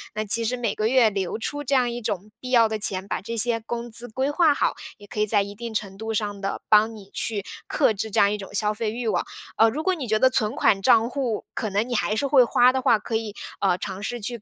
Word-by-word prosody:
那 215 0 -2
其 230 +3 +2
实 250 +3 -1
每 230 -4 -1
个 215 0 0
月 245 -2 +4
留 195 -1 -3
出 290 +5 -3
这 275 0 0
样 250 -2 +3
一 240 +1 -5
种 210 -2 -4
必 255 - -8
要 230 -3 +5
的 220 0 -3
钱， 190 -1 -1
把 - - -3
这 230 +3 -5
些 230 +1 +4
工 235 +1 -6
资 235 +2 0
规 260 +5 -2
划 315 -1 +4
好， - - 0 0.2
也 205 - -14
可 210 - -7
以 210 - +2
在 205 -1 +5
一 200 0 -8
定 230 +1 -7
程 195 -2 -4
度 220 +1 -4
上 205 -2 -3
地， 195 0 -3
帮 215 +1 +4
你 200 -2 -13
去 210 -3 -2 0.2
克 - - +2
制 215 +2 -4
这 - - +1
样 200 - +4
一 210 - -2
种 195 -1 -10
消 210 +1 0
费 215 0 -3
欲 235 +1 -4
望。 - - 0 0.3
呃， 225 - +5
如 295 +8 -4
果 375 - +2
你 280 -7 -5
觉 215 0 +2
得 260 - +5
存 220 -4 0
款 195 -3 +2
账 225 +4 +4
户， 250 -5 -3
可 215 - -3
能 205 +4 0
你 245 - -4
还 215 -1 0
是 250 - 0
会 270 -2 +6
花 245 +1 +4
的 260 - -1
话， 235 - +4
可 225 - -5
以， 220 -2 -3 0.2
呃， 185 -3 +2
尝 190 +1 -6
试 240 +4 -4
去 235 +1 -2
220 Hz, 300 characters per minute, -24 LUFS, 205-240 Hz, 0.3 s, 会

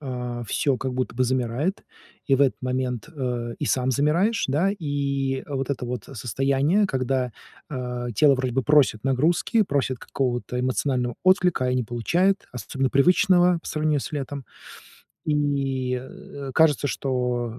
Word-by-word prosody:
а, 125 -3 -4
всё 135 +5 0
как 130 0 -3
будто 130 -1 -2
бы 130 +2 +2
замирает, 130 - -1 0.4
и 135 - +4
в 135 - +1
этот 135 - +2
момент, 125 -2 -2
э, 120 -4 -3
и - - -2
сам 130 -2 +1
замираешь, 170 - +2
да? 155 +9 +2
И 140 -3 -1
вот 135 -1 -2
это 125 -3 -3
вот 120 -3 -4
состояние, 135 - +1
когда, 130 -4 -1 0.4
а, 125 -2 -4
тело 140 +5 +5
вроде 130 -1 -2
бы 135 +2 +1
просит 140 -7 +3
нагрузки, 160 - +2
просит 140 -7 -1
какого-то 125 -1 -2
эмоционального 125 -1 0
отклика, 185 -7 +3
а - - +1
и 125 - +1
не 125 -2 0
получает, 175 - +1
особенно 130 +3 -2
привычного 180 +4 +4
по - - -12
сравнению 155 -1 0
с - - -7
летом. 140 -1 -4 0.8
И, 135 -4 0
э, 135 +1 -9
кажется, 150 -1 +3
э, - - -1
что 125 -3 -2
135 Hz, 155 wpm, -24 LUFS, 125-150 Hz, 0.8 s, тело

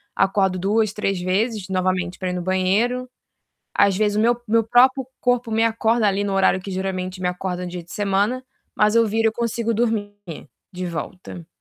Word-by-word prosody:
Acordo 190 -1 +2
2, 205 +3 +1
3 195 -3 -1
vezes 200 +2 -1
novamente 185 -1 -1
pra 185 -1 -3
ir - - -2
no 180 - -3
banheiro. 195 +8 0 0.7
Às 200 -1 +3
vezes, 210 -1 +1
o - - +3
meu 240 +1 +2
meu 225 +1 +3
próprio 255 +3 +4
corpo 245 -1 +1
me 225 +1 +1
acorda 225 0 +2
ali 200 0 +1
no 200 -1 -2
horário 190 0 +3
que 195 - -8
geralmente 185 0 -3
me 180 - 0
acorda 180 0 -3
no 180 - -5
dia 175 -1 -6
de 170 - -17
semana. 205 +5 0 0.3
Mas 210 +1 +3
eu 230 0 +5
viro, 225 +2 +1
eu - - -11
consigo 230 0 -1
dormir 220 -3 -1 0.6
de 180 -1 -5
volta. 175 0 -7
205 Hz, 190 wpm, -22 LUFS, 185-225 Hz, 0.7 s, eu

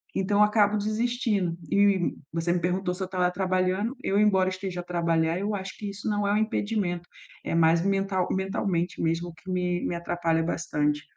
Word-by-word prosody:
Então 200 +2 +2
acabo 210 0 +3
desistindo. 215 -4 0 0.2
E 200 -3 +3 0.2
você 165 +1 0
me 180 - +1
perguntou 180 +1 -1
se 190 +1 -4
eu - - -1
estava 180 -1 +1
trabalhando. 185 +4 0
Eu, 200 - +1
embora 190 -3 +4
esteja 185 -1 -5
a - - -4
trabalhar, 170 -1 +1
eu 205 +1 -1
acho 190 -1 -6
que 205 -1 -5
isso 200 +2 -5
não 205 -1 0
é - - +2
um - - +3
impedimento, 205 -5 -1 0.4
é - - -3
mais 165 0 +4
mental 195 -1 +1
mentalmente 190 -2 -1
mesmo 165 +1 -1
que 185 +4 -9
me 180 -1 -1
me - - -1
atrapalha 170 -1 0
bastante. 150 -3 -1
185 Hz, 185 wpm, -27 LUFS, 175-200 Hz, 0.4 s, embora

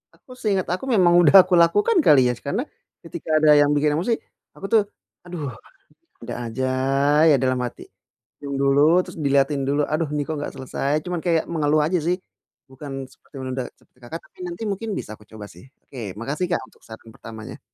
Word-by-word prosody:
aku 255 - -20
seinget 195 -4 0
aku 185 - -4
memang 175 -3 +4
udah 170 +3 +5
aku 185 - -3
lakukan 205 - +3
kali 145 -3 +7
ya, - - 0
karena, 205 - -1 0.4
ketika 165 -1 -9
ada 155 -1 +5
yang 145 0 +4
bikin 145 0 +2
emosi 185 +9 0 0.4
aku 195 - -8
tuh, 220 - +6 0.5
"Aduh, 165 -5 -5 0.8
ada - - -5 0.2
aja 130 +3 -2 0.6
ya" - - +6
dalam 130 0 0
hati, 120 - -6 0.6
diam 140 -1 -5
dulu, 145 +6 +4
terus - - -11
diliatin 140 0 +2
dulu, 145 +1 +1
"aduh 155 -1 0
ini 150 -1 -1
kok 160 - -3
nggak - - -5
selesai?" 135 +2 -3
Cuman 180 -2 -3
kayak 165 -2 +2
mengeluh 155 -1 +2
aja 180 +3 +1
sih, 175 +3 0 0.5
bukan 135 0 -7
seperti - - -27
menunda 130 0 -4
seperti - - -31
Kakak 120 +7 -7
tapi - - -26
nanti 345 -8 -7
mungkin 215 +3 -4
bisa - - -7
aku 105 - -20
coba 110 -2 -10
sih, 90 - -15 0.2
oke 135 - -13 0.2
makasih 145 +9 -2
Kak - - 0
untuk - - -26
saran 110 0 -12
pertamanya. 110 -1 -10
150 Hz, 190 wpm, -22 LUFS, 135-175 Hz, 0.8 s, kali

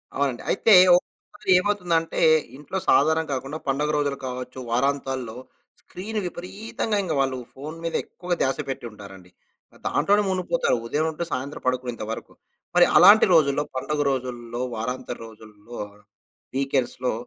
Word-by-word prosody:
అవునండి. 135 -3 -1
అయితే 220 +2 +4 0.2
ఒకొసారి 190 +2 -4
ఏమవుతుందంటే, 180 -5 0 0.4
ఇంట్లో 150 +6 -5
సాధారణంగా 160 +1 +3
కాకుండా 135 +4 -5
పండుగ 140 +2 0
రోజులు 145 -1 0
కావచ్చు 125 0 -6
వారాంతాల్లో. 130 -2 -1 0.5
స్క్రీన్ 215 +4 -5
విపరీతంగా 200 +5 -4
ఇంగ 175 - -2
వాళ్ళు 135 -1 +1 0.2
ఫోన్ 150 +4 -8
మీద 165 - -3
ఎక్కువగా 180 0 -4
ధ్యాస 135 - +1
పెట్టి 135 - -4
ఉంటారండి. 95 -3 -13 0.6
దాంట్లోనే 205 +1 +2
మునిగిపోతారు. 185 - 0
ఉదయం 150 +7 0
ఉంటే 160 +2 -4
సాయంత్రం 135 +3 -4
పడుకునేంత 125 -3 -2
వరకు. 115 - -7 0.4
మరి 175 0 +7
అలాంటి 200 +5 +8
రోజుల్లో, 145 -3 +4
పండుగ 145 +3 -1
రోజుల్లో, 120 -2 -4
వారాంతర 125 +2 -4
రోజుల్లో, 110 +1 -12 0.8
వీకెండ్స్‌లో. 135 -2 0
140 Hz, 125 wpm, -24 LUFS, 125-175 Hz, 0.8 s, అలాంటి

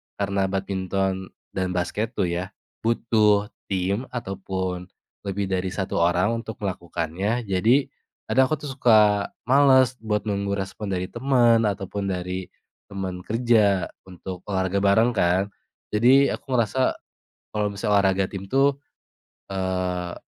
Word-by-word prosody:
karena 100 -1 0
badminton 95 0 -2 0.2
dan 95 -1 -1
basket 105 +6 -2
tuh 90 -2 0
ya 90 +3 -3 0.3
butuh 110 -3 +2 0.2
tim 100 +5 -1
ataupun 95 -5 -4 0.4
lebih 100 0 -2
dari 95 0 0
1 95 -2 -2
orang 90 +5 +3
untuk 110 - -7
melakukannya, 90 +5 -2
jadi 110 +8 +2 0.3
kadang 130 0 +3
aku 155 - 0
tuh 140 - -4
suka 105 -4 +4 0.2
malas 130 -1 +4
buat 105 -2 -1
nunggu 100 -1 -1
respon 100 +2 -5
dari 90 -1 -3
teman 120 -3 +3
ataupun 100 0 -3
dari 90 0 -3 0.4
teman 95 -2 -4
kerja 110 -4 +2 0.2
untuk 90 0 -8
olahraga 95 0 0
bareng 110 +5 +4
kan. 95 0 +2 0.5
Jadi 130 +6 +6
aku - - -8
ngerasa 130 +3 +1 0.6
kalau 105 -1 0
misalnya 105 +1 -1
olahraga 95 -1 +2
tim 95 -1 -6
tuh, 135 +1 +4 0.8
eee, 90 -2 -2
100 Hz, 125 wpm, -24 LUFS, 95-110 Hz, 0.8 s, Jadi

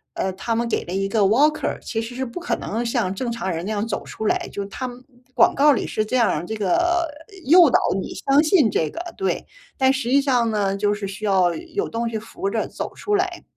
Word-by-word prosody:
呃， 190 - -1
他 230 +5 -2
们 235 0 0
给 - - -1
了 175 - -9
一 195 +1 0
个 215 +2 +1
walker， 265 +10 +2
其 225 -1 -3
实 230 +2 -7
是 265 - -2
不 235 +6 -9
可 - - -1
能 230 +3 -3
像 230 -6 -1
正 240 +2 -3
常 230 -5 -3
人 170 0 -3
那 215 - -3
样 215 +1 -1
走 200 - -3
出 220 - -7
来， - - 0
就 200 - -4
他 250 +6 -5
们 245 +1 -12 0.3
广 - - +4
告 295 +2 +6
里 250 - 0
是 215 - -1
这 255 +4 0
样 230 -5 +3
儿 165 0 -2
这 220 - -5
个 345 - +1 0.4
诱 335 +1 +7
导 - - +4 0.2
你 - - -6
相 280 +2 +3
信 310 - +4
这 160 -4 0
个， - - -7 0.2
对。 390 - -1 0.3
但 265 -1 +4
实 260 -3 -2
际 275 +2 +4
上 245 -5 +2
呢， 200 -2 0
就 205 +1 +1
是 205 -1 -4
需 195 +3 -8
要 185 -4 +3
有 350 +5 -4
东 230 0 -2
西 220 -1 -3
扶 195 -2 -5
着 220 +1 -1
走 - - -6
出 415 -1 -1
来。 370 -2 -1
230 Hz, 285 characters per minute, -22 LUFS, 200-275 Hz, 0.4 s, 诱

